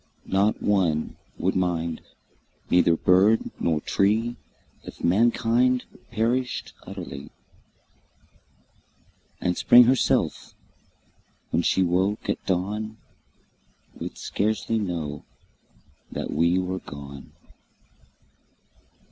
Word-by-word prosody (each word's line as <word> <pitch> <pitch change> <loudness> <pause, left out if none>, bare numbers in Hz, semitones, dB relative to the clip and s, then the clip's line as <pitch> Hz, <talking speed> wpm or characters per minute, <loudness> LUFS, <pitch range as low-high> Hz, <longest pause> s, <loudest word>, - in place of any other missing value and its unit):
Not 100 +3 +1
one 90 -7 +1 0.2
would - - 0
mind, 85 -3 -1 0.7
neither 90 -1 +5
bird 95 +6 +3
nor 80 -2 +1
tree 110 +4 +1 0.5
If - - -11
mankind 120 +5 +2 0.2
perished 120 +3 -1
utterly; 85 -8 -7 2.1
And 90 0 0
Spring 120 +6 +7
herself, 125 +1 +1 1.0
when - - +2
she 95 - +2
woke 95 +4 0
at - - -5
dawn, 105 +4 -2 1.0
Would - - -6
scarcely 110 +2 -1
know 80 -7 -4 0.9
that - - -4
we 85 +4 +2
were 95 0 -2
gone. 70 -3 -10
95 Hz, 85 wpm, -25 LUFS, 85-110 Hz, 2.1 s, Spring